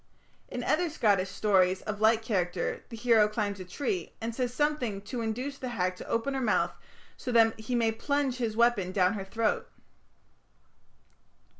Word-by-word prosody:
In - - -5
other 350 -1 +1
Scottish 200 -10 +2
stories 190 -2 +2
of 210 0 -5
like 220 +1 +4
character 180 -5 -1
the 230 - -8
hero 225 -2 +4
climbs 210 -2 -2
a - - -5
tree, 295 - -3
and 230 +1 -3
says 245 0 -1
something 250 -8 -1
to 245 +2 -4
induce 250 +5 -3
the 255 - -4
hag 185 -6 -1
to - - -9
open 230 +4 -1
her 265 - -1
mouth, 230 - +1 0.4
so 250 - -5
that 225 -2 +4
he 220 +3 -3
may 230 -2 +2
plunge 270 +3 -1
his 225 -3 -2
weapon 235 -6 +3
down 185 0 +3
her 200 -3 -4
throat. 220 +3 -1
225 Hz, 170 wpm, -29 LUFS, 200-245 Hz, 0.4 s, like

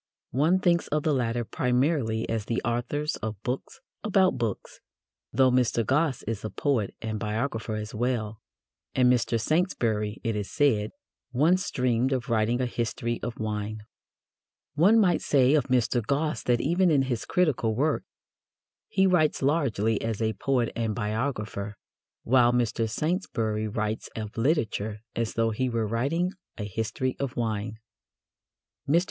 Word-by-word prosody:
One 155 +9 +3
thinks 175 -2 +2
of 150 0 0
the 155 - +2
latter 120 -2 0
primarily 125 -3 0
as 110 -2 -2
the 115 - -1
authors 120 +6 -1
of 110 -3 -5
books 125 +2 -4 0.2
about 190 -3 +3
books, 115 -4 -3 0.5
though 130 +2 +4
Mr. 120 -2 +2
Gosse 135 0 +1
is 110 -1 -4
a 110 - -3
poet 125 -8 -1
and 110 -1 -3
biographer 110 +1 -2
as 105 0 -5
well, 110 -2 -2 0.5
and 125 -1 +5
Mr. 115 -1 +1
Saintsbury, 115 - 0
it 115 -3 -1
is 105 -1 -3
said, 115 -8 +2 0.4
once 170 +9 +2
dreamed 125 0 +1
of 125 -3 -2
writing 115 +1 +2
a 130 - +1
history 120 0 -2
of 120 - -4
wine. 105 0 -3 0.9
One 190 +10 +5
might 180 -5 +3
say 135 -1 +4
of 150 -5 +3
Mr. 125 -2 +2
Gosse 145 +6 0
that 120 -1 +3
even 175 +5 +3
in 145 -4 +4
his 125 -4 -2
critical 145 - +1
work 150 +5 +1 0.8
he 190 0 +2
writes 165 -7 +2
largely 120 -8 +1
as 115 -2 -2
a 110 -1 0
poet 125 -2 0
and 115 -2 -1
biographer, 105 -2 -3 0.5
while 120 0 +4
Mr. 115 -2 0
Saintsbury 110 - -1
writes 110 +1 -3
of 110 -1 -5
literature 110 - 0
as 115 -1 -2
though 115 0 +2
he 130 +4 -1
were 115 -2 0
writing 140 - 0 0.3
a 105 - -4
history 110 +5 -2
of 135 -3 -3
wine. 110 -2 -2 1.1
Mr. 165 +4 +6
120 Hz, 150 wpm, -27 LUFS, 110-140 Hz, 1.1 s, Mr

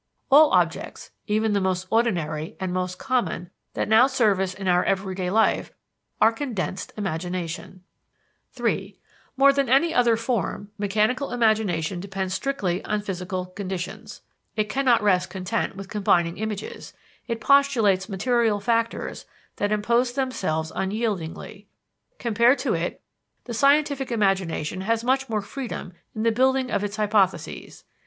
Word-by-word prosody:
All 300 +2 +8
objects, - - 0 0.2
even 215 0 +1
the 200 - +1
most 185 0 -1
ordinary 175 -7 0
and 185 -2 -3
most 180 0 -2
common 240 -9 -1 0.2
that - - -1
now 220 +4 +6
serve 220 -8 +2
us 190 -1 -1
in 195 -1 -5
our 180 0 +4
everyday 190 -1 -1
life, 220 +4 +2 0.5
are 220 +1 +6
condensed 225 -7 -4
imagination. 180 -1 -4 0.8
(III) - - -2 0.4
More 275 +1 +6
than 275 -2 0
any 320 +6 +4
other 235 -2 +3
form, 225 -3 -2
mechanical 215 +7 +1
imagination 215 -8 +1
depends 190 0 -4
strictly 190 -6 -1
on 210 0 -1
physical 185 -1 -4
conditions. 195 +3 -6 0.3
It 215 -1 0
cannot 260 -5 +2
rest 185 -3 +2
content 190 +3 -2
with 195 0 -8
combining 180 -5 +1
images, 215 -1 -5 0.3
it 230 -1 -2
postulates 230 -8 +3
material 225 +1 +1
factors 230 +2 -1 0.3
that 205 0 0
impose 235 +4 +1
themselves 185 - -2
unyieldingly. 200 -1 -3 0.5
Compared 235 +3 +3
to - - -1
it, - - -3 0.4
the 240 - -6
scientific 280 +1 +2
imagination 190 -6 0
has 225 +3 0
much 265 +1 +1
more 215 -2 -1
freedom 245 -6 -6 0.2
in 215 - -2
the 230 - +3
building 260 +2 +2
of 200 - 0
its 205 0 -3
hypotheses. 210 -3 0
210 Hz, 135 wpm, -24 LUFS, 185-235 Hz, 0.8 s, All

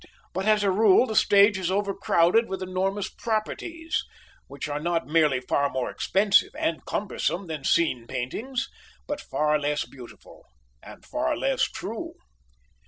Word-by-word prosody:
But 190 +2 -2
as 215 -1 +4
a 200 - +3
rule 210 +3 +5
the 220 -4 -4
stage 200 -1 +5
is 180 -2 -1
overcrowded 195 +1 +2
with 190 0 -4
enormous 190 +2 -1
properties, 320 +9 -3 0.4
which - - -6
are 145 0 -3
not 165 -1 -1
merely 150 -3 +3
far 140 +2 +1
more 130 -2 -3
expensive 195 +1 +2
and 165 - -1
cumbersome 195 -2 -2
than 155 -4 -6
scene 130 -8 +1
paintings, 220 - -3 0.4
but 290 0 -4
far 150 +2 0
less 145 0 -1
beautiful, 125 -3 -14 0.3
and - - -13
far - - -1
less - - +1
true. - - -6
185 Hz, 145 wpm, -26 LUFS, 150-210 Hz, 0.4 s, rule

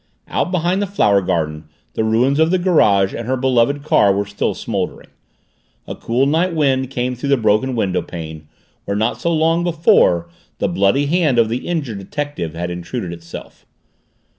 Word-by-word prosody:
Out - - -1
behind 180 +2 0
the 205 - -1
flower 105 - +2
garden 80 -3 -2 0.3
the - - -1
ruins 120 +6 +2
of 160 0 +4
the 185 - +2
garage 105 - +3
and 115 - -5
her 130 +1 0
beloved 130 +2 +1
car 105 -9 +4
were 100 +1 0
still 100 0 -2
smoldering; - - -4 0.8
a - - -6
cool 125 +4 0
night 165 +5 +1
wind 135 -4 +1
came 125 -1 -2
through 125 +3 -4
the 140 - +4
broken 110 +3 +1
windowpane 85 -6 -3 0.4
where 100 0 -2
not 110 - -1
so 170 - 0
long 165 +1 +2
before 160 - +3 0.3
the - - 0
bloody 100 +10 +2
hand 155 -4 +1
of 115 -2 +3
the 120 +2 -3
injured 145 -12 -3
detective 100 - -5
had 85 +1 -3
intruded 90 +2 -5
itself. 85 0 -11
125 Hz, 170 wpm, -18 LUFS, 100-150 Hz, 0.8 s, of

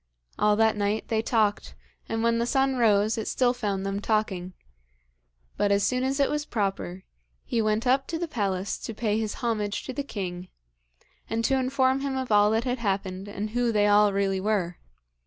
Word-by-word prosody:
All 210 0 +4
that 220 0 +3
night 205 +1 -1
they 220 -1 +1
talked, 220 -3 0 0.3
and 225 0 -1
when 230 0 +2
the 235 - 0
sun 270 0 +2
rose 215 -1 +3
it 220 - -4
still 250 -1 +2
found 200 -5 -2
them 195 0 -2
talking. 200 -4 -1 1.0
But 205 - +2
as 200 0 +3
soon 250 +5 +1
as 270 +2 -1
it 280 - +4
was 295 0 -1
proper, 195 -6 -3 0.4
he 230 - 0
went 215 +1 0
up 265 +2 +2
to 330 - -3
the 340 +1 -3
palace 200 - -2
to 225 - -6
pay 215 -1 0
his 215 -2 -3
homage 210 -3 -1
to 260 - -6
the 285 - -2
king, 185 -8 -5 0.8
and 230 +1 -1
to - - +2
inform 260 0 +2
him 275 -1 -2
of 260 -3 -3
all 205 0 +5
that 220 +2 +1
had 250 0 -2
happened 195 -2 -2
and 205 +1 -5
who 240 0 +1
they 210 -2 +3
all 205 0 +5
really 195 -1 0
were. 190 -4 -1
215 Hz, 195 wpm, -26 LUFS, 200-245 Hz, 1.0 s, all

